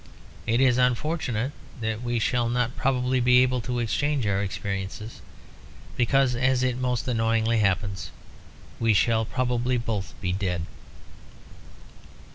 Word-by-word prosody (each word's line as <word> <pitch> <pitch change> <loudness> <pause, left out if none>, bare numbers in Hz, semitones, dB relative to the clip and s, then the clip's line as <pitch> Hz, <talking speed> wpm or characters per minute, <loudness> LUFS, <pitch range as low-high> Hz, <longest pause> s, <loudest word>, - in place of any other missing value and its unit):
It 115 +2 +2
is 130 -2 +4
unfortunate 125 -1 0 0.3
that 110 0 -2
we 120 -1 -1
shall 120 +1 +1
not 120 0 0
probably 130 -1 +1
be 125 +1 +5
able 125 -1 0
to 125 +2 -3
exchange 135 +3 0
our 100 -1 +1
experiences, 100 +2 -5 0.7
because, 130 +1 +2
as 130 +1 +2
it 125 -1 0
most 125 0 -1
annoyingly 115 -1 +1
happens, 100 -1 0 0.7
we 115 -2 +3
shall 115 +1 +3
probably 125 0 0
both 105 -7 -3
be 90 -3 -1
dead." 90 -3 -2
120 Hz, 125 wpm, -26 LUFS, 110-125 Hz, 0.7 s, be